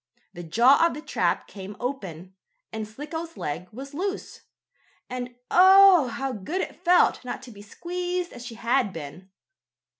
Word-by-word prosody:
The 175 - -8
jaws 235 - +4
of - - -5
the 300 - -7
trap 305 - 0
came 200 0 -9
open, 190 - -5 0.4
and 220 -1 -4
Slicko's 320 +8 -7
leg 160 +5 -4
was 275 +5 -9
loose. 385 +6 -4 0.7
And 250 -1 -5 0.2
oh! 375 -4 +7
how 270 +2 -3
good 280 - -3
it - - -7
felt 355 -5 +4
not 250 +1 -6
to 255 - -11
be 205 -2 -13
squeezed 355 - -4
as 240 - -10
she 235 -1 -8
had 235 -3 0
been. 165 +4 -9
255 Hz, 155 wpm, -25 LUFS, 205-335 Hz, 0.7 s, oh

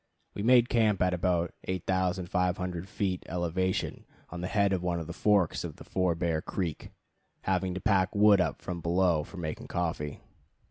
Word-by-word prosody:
We - - -5
made 120 +2 +5
camp 110 -6 +2
at 90 0 +2
about 85 -1 0
8500 90 -1 -1
feet 95 -3 -1
elevation 90 +2 -1 0.2
on 90 0 -5
the 90 - -2
head 100 0 +2
of 95 - 0
one 90 -1 -1
of 80 - -5
the 85 - -6
forks 100 -3 +2
of - - -6
Four 90 -2 0
Bear 85 -2 0
Creek, 85 -4 -4 0.5
having 95 -1 0
to 95 - -4
pack 95 -2 +2
wood 100 -2 +6
up - - -2
from 85 -2 -4
below 85 -1 +2
for 100 - -12
making 80 -3 -5
coffee. 80 -4 -3
90 Hz, 170 wpm, -29 LUFS, 85-95 Hz, 0.5 s, wood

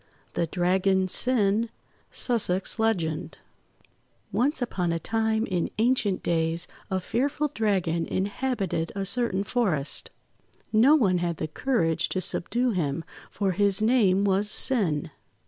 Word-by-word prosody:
THE 170 - -1
DRAGON 185 +2 +1
SIN 225 -1 +3 0.4
Sussex 210 -4 +1
Legend 175 -9 -1 0.9
ONCE 255 +9 0
upon 185 -8 -2
a 165 - -1
time, 220 +4 -1
in 180 -5 -2
ancient 225 -4 +1
days, 165 +1 -1 0.2
a 190 - -1
fearful 275 +9 -1
Dragon 190 -8 -1
inhabited 195 -4 -2
a 195 -1 -3
certain 200 -2 +1
forest. 190 - -1 0.6
No 245 +8 +5
one 190 - +2
had 170 -2 -2
the 155 - -3
courage 165 - -1
to 185 - -2
subdue 240 +7 +1
him, 160 -5 -2 0.3
for 195 -2 -1
his 200 +1 +1
name 215 -4 +2
was 200 +1 +2
Sin. 195 - +3
195 Hz, 125 wpm, -25 LUFS, 175-230 Hz, 0.9 s, No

